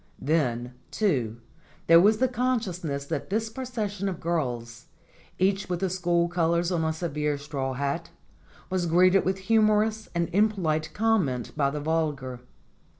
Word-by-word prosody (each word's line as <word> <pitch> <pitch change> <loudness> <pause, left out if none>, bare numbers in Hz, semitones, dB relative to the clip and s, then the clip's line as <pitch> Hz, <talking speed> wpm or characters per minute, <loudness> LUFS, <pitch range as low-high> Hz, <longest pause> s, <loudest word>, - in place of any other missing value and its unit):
Then, 125 -5 0 0.2
too, 130 - 0 0.5
there 165 0 +7
was 210 +3 +5
the 260 - +3
consciousness 195 - -2
that - - -4
this 220 +3 -1
procession 215 -6 -3
of 180 - -5
girls, 125 -8 -3 0.5
each 195 +1 +1
with 175 -1 -1
the 190 -1 -1
school 175 -2 +1
colors 170 0 +1
on 170 -2 0
a 160 - +1
severe 150 -3 -2
straw 140 -2 -4
hat, 140 +6 -2 0.6
was 185 -2 0
greeted 185 +3 +5
with 190 +1 0
humorous 215 0 +3
and 170 -1 +1
impolite 180 -7 +1
comment 195 - 0
by 140 -3 +2
the 150 +2 -4
vulgar. 145 -5 -1
170 Hz, 145 wpm, -26 LUFS, 145-200 Hz, 0.6 s, there